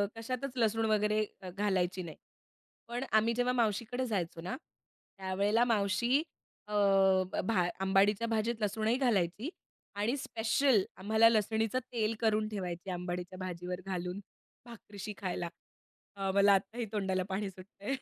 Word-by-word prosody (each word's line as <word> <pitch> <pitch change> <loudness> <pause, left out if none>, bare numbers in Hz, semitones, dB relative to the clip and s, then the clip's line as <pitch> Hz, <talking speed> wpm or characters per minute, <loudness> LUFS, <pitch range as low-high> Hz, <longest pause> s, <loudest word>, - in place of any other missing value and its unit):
कशातच 255 +4 -4
लसूण 225 -1 +2
वगैरे 215 0 +2 0.2
अ, 185 - -7
घालायची 185 -1 0
नाही. 160 -3 -8 0.7
पण 240 +2 -3
आम्ही 220 +2 +4
जेव्हा 245 +1 +1
मावशीकडे 235 +2 0
जायचो 175 -7 -2
ना, 180 - -4 0.6
त्यावेळेला 200 +4 +2
मावशी 225 +3 +2 0.5
अ, 210 - -7 0.7
भा 185 -4 +2
अंबाडीच्या 195 +3 +3
भाजीत 225 +1 0
लसूणही 215 +3 +1
घालायची 220 - +1 0.5
आणि 210 +6 0
स्पेशल 230 -1 +2
आम्हाला 220 +4 +5
लसणीचं 220 +2 +1
तेल 225 -2 0
करून 215 -1 +2
ठेवायची, 185 -3 -4
अंबाडीच्या 180 +1 -4
भाजीवर 180 0 -4
घालून 180 0 -3 0.5
भाकरीशी 210 -3 -8
खायला. 175 -2 -3 0.7
अ, 195 -1 -1
मला 200 0 +6
आत्ताही 220 +5 0
तोंडाला 190 -2 0
पाणी 195 +1 -2
सुटतंय. 195 +6 -6
210 Hz, 125 wpm, -32 LUFS, 190-225 Hz, 0.7 s, मला